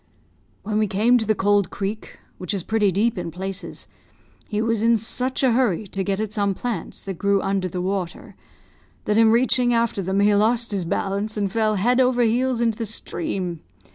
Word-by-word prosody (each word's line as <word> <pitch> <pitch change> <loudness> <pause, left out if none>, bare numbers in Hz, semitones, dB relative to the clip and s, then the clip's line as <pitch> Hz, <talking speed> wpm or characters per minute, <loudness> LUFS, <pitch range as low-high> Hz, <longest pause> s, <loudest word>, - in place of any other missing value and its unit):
"When 215 +1 -1
we 215 - +2
came 225 +6 +3
to 220 - -3
the 215 - +2
Cold 205 -1 +2
Creek, 205 +2 -5 0.2
which 180 +2 -2
is 190 - -3
pretty 210 -2 +1
deep 210 +2 +1
in 175 -1 -4
places, 190 +3 -6 0.6
he 210 - -1
was 225 -1 0
in 230 +1 +4
such 250 +5 -1
a 260 - +4
hurry 225 -5 +1
to 195 0 -4
get 195 0 -1
at 215 -1 -3
some 200 -2 0
plants 240 +3 -4
that 195 -3 -7
grew 200 0 +2
under 195 -1 -1
the 180 +1 -4
water, 185 -2 -4 0.7
that 210 +1 +2
in 225 -1 +6
reaching 245 +1 +3
after 230 -3 0
them 190 +2 -1
he 205 +1 +4
lost 225 +3 +2
his 195 -4 -1
balance 200 +5 -2
and 200 -2 -1
fell 215 0 +1
head 245 +6 +2
over 250 -1 +3
heels 240 +2 +1
into 230 -1 0
the 225 - -2
stream. 195 - -4
210 Hz, 200 wpm, -22 LUFS, 195-230 Hz, 0.7 s, in